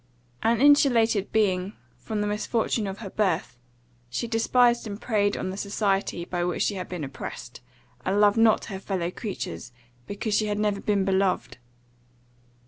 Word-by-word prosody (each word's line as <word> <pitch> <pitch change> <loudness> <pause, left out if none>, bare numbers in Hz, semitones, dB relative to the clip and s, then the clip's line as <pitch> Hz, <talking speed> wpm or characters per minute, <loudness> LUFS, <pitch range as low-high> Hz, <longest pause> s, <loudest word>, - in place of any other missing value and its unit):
An 230 0 +2
insulated 240 -7 +4
being, 195 -2 +1 0.3
from 215 -1 -3
the - - 0
misfortune 210 +1 -1
of 195 0 -5
her - - -5
birth, 180 - -1 0.5
she 235 - -3
despised 235 +1 +3
and 200 0 -6
preyed 205 -4 +1
on 185 - -3
the 190 - -7
society 200 -3 -1
by 175 -1 -2
which 175 0 0
she - - 0
had 185 -3 -6
been 180 -4 -5
oppressed, 135 -1 -7 0.4
and 195 +2 +1
loved 205 0 +5
not 225 -1 +4
her 190 -2 -6
fellow 185 -3 -2
creatures, 180 - -6 0.4
because 205 +1 -3
she 215 +1 +2
had 205 0 -1
never 210 -1 0
been 200 -2 +1
beloved. 190 -8 0
205 Hz, 160 wpm, -26 LUFS, 190-220 Hz, 0.5 s, loved